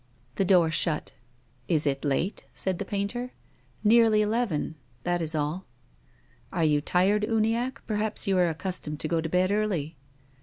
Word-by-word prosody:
The 195 - 0
door 175 -3 +4
shut. 155 -1 0 0.3
" 120 -1 -37
Is 155 -3 +4
it 135 -1 0
late? 150 +7 -1
" - - -36
said 185 -2 -1
the 200 - -3
painter. 205 +6 -3 0.2
" - - -36
Nearly 220 -1 +5
eleven. 210 -9 -1 0.3
That 175 0 0
is 160 0 0
all." 155 +5 -2 0.4
" - - -34
Are 170 - 0
you 150 -1 +3
tired, 190 +7 +2
Uniacke? 225 +3 0
perhaps 215 0 0
you 195 -2 +1
are 180 - +5
ac 160 - -3
customed 165 -5 -3
to - - -2
go 165 0 0
to 160 - -4
bed 180 +3 +2
early 185 -8 -1
180 Hz, 185 wpm, -27 LUFS, 155-210 Hz, 0.4 s, Nearly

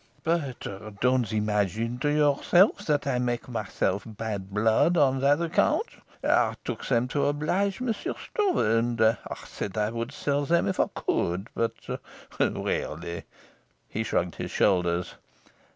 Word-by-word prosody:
"But 160 -6 -1 0.3
don't 125 -2 +2
imagine 105 +2 0
to 145 +2 +1
yourself 150 +7 +3
that 145 -2 +1
I 130 -3 0
make 120 0 -1
myself 105 -4 -1
bad 105 -3 -5
blood 110 - +3
on 135 -3 +4
that 140 +3 +4
account. 170 - +2 0.4
I - - +3
took - - -4
them 125 -1 +2
to 140 +1 +1
oblige 180 +7 0
Monsieur 235 -5 -2
Stroeve, 405 -4 0 0.2
and 120 0 -1
I 110 +1 +4 0.3
said 100 - -5
I 105 0 +1
would 115 +2 -4
sell 145 0 -1
them 170 0 +3
if 190 - -2
I - - +4
could. 90 +6 -1
But 115 - -1 0.6
really 85 0 -2 0.3
" - - -40
He 110 - -2
shrugged 90 -5 -1
his - - -4
shoulders. 90 -3 +1
125 Hz, 145 wpm, -27 LUFS, 105-150 Hz, 0.6 s, on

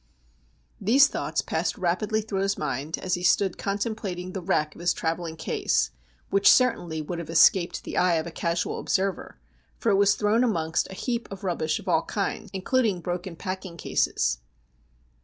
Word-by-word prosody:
These 265 +8 +5
thoughts - - -2
passed - - -1
rapidly 205 +4 0
through 205 -3 -3
his 195 0 0
mind, 150 +1 -3
as 185 - -3
he 175 - 0
stood 190 +1 +2
contemplating 200 -3 -3
the 190 - -4
wreck 155 -4 0
of - - -12
his 175 - +2
travelling 165 0 -2
case, 65 - 0 0.4
which 195 0 +6
certainly 175 -11 +2
would 170 +3 -5
have 170 - -7
escaped 170 +2 +4
the - - -5
eye 180 -1 +4
of 160 - -1
a 170 - -6
casual 170 +1 -2
observer, 195 0 -1 0.4
for 230 - +1
it - - +4
was 200 0 +4
thrown 215 +3 +2
amongst 165 -9 0
a 190 - -8
heap 235 +3 -2
of 195 -1 -8
rubbish 160 -4 0
of - - -11
all - - +3
kinds, - - -3
includ 225 +6 +1
ing 190 -4 -1
broken 175 +1 -4
packing 185 -1 -6
cases. - - 0
185 Hz, 175 wpm, -26 LUFS, 170-200 Hz, 0.4 s, which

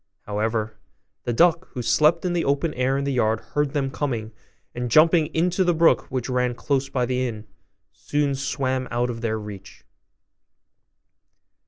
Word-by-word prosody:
However, 110 +1 -2 0.5
the 120 - 0
duck, 170 +7 +3
who 125 - -4
slept 155 +8 +3
in 180 - 0
the 175 - 0
open 140 +3 0
air 130 +2 0
in 140 - -1
the 140 0 -1
yard, 110 -3 +1
heard 145 +3 -2
them 135 -3 -1
coming, 120 -7 -3 0.4
and 120 0 -3
jumping 160 +4 +5
into 175 +4 +1
the 175 -2 +2
brook 165 +1 +3
which 125 -2 -3
ran 125 -1 0
close 135 +1 -1
by 125 -2 0
the 130 +1 -1
inn, 110 -2 -7 0.5
soon 145 -1 -1
swam 130 -1 -2
out 120 0 0
of 115 -1 -7
their 110 -2 -1
reach. 105 -2 -10
130 Hz, 165 wpm, -23 LUFS, 120-150 Hz, 0.5 s, jumping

